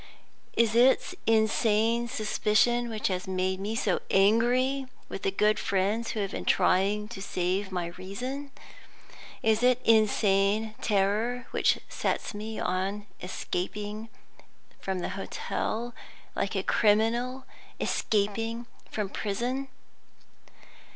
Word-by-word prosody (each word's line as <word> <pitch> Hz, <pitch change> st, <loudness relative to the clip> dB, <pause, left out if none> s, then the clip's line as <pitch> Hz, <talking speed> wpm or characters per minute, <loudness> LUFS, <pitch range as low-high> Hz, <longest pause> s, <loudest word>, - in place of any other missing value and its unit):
Is 230 Hz, -2 st, +4 dB
it 255 Hz, +9 st, +4 dB
insane 225 Hz, +1 st, +3 dB
suspicion 235 Hz, +2 st, +1 dB
which 220 Hz, -2 st, -1 dB
has 185 Hz, -1 st, -3 dB
made 185 Hz, 0 st, -1 dB
me 210 Hz, +3 st, -3 dB
so 200 Hz, -5 st, +1 dB
angry 245 Hz, +7 st, +3 dB, 0.2 s
with -, -, -6 dB
the -, -, +1 dB
good 210 Hz, +2 st, +2 dB
friends 200 Hz, +4 st, 0 dB
who 215 Hz, -, -2 dB
have 195 Hz, -, -2 dB
been -, -, -4 dB
trying 205 Hz, +3 st, +2 dB
to 195 Hz, -, -7 dB
save 190 Hz, +1 st, -1 dB
my 175 Hz, -2 st, -2 dB
reason? 255 Hz, +10 st, -5 dB, 0.9 s
Is 220 Hz, 0 st, +3 dB
it 250 Hz, 0 st, +4 dB
insane 215 Hz, -1 st, +3 dB
terror 215 Hz, +4 st, +1 dB
which -, -, +3 dB
sets -, -, -2 dB
me 215 Hz, +2 st, -5 dB
on 195 Hz, +3 st, -1 dB, 0.2 s
escaping 205 Hz, +4 st, -4 dB, 0.7 s
from 190 Hz, -2 st, -3 dB
the -, -, -2 dB
hotel 225 Hz, +4 st, -3 dB, 0.4 s
like -, -, -1 dB
a -, -, 0 dB
criminal 235 Hz, +5 st, +2 dB, 0.3 s
escaping 225 Hz, +3 st, 0 dB, 0.2 s
from 210 Hz, -2 st, -2 dB
prison? 240 Hz, +8 st, -2 dB
215 Hz, 115 wpm, -28 LUFS, 195-235 Hz, 0.9 s, Is